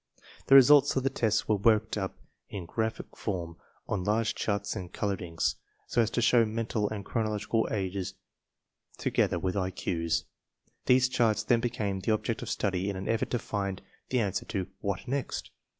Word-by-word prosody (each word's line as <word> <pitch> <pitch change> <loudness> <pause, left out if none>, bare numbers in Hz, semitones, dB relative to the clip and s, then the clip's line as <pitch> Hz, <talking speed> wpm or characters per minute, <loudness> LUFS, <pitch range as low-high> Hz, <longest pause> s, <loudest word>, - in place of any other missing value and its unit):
The 135 - +7
results 135 +1 +7
of 130 - +1
the 135 - +1
tests 110 -5 +1
were 110 - +3
worked 110 +1 +3
up 95 -3 -3 0.3
in 95 -4 -6
graphic 110 +6 -3
form 85 -5 -4 0.3
on 100 -4 -1
large 110 +3 +1
charts 100 0 -2
in 90 -4 -5
colored 100 +1 -2
inks, 85 -1 -1 0.3
so 120 - +2
as 110 - +1
to 120 - 0
show 120 0 +5
mental 110 -1 -1
and 105 -2 -5
chronological 110 0 0
ages 95 -2 -3 0.8
together - - +1
with 95 -1 -1
IQ's. 90 -3 -1 0.6
These 130 0 +5
charts 115 -4 +2
then 120 +1 +3
became 110 -5 -2
the 105 +4 +1
object 110 +1 -2
of - - -5
study 95 -1 -1
in 100 - -3
an 95 +1 -5
effort 115 0 0
to 120 - +1
find 100 -4 -3 0.3
the 130 - +2
answer 100 -4 -1
to 95 -5 -2
"What 100 -3 -3
next?" 135 +1 -3
105 Hz, 175 wpm, -29 LUFS, 95-115 Hz, 0.8 s, The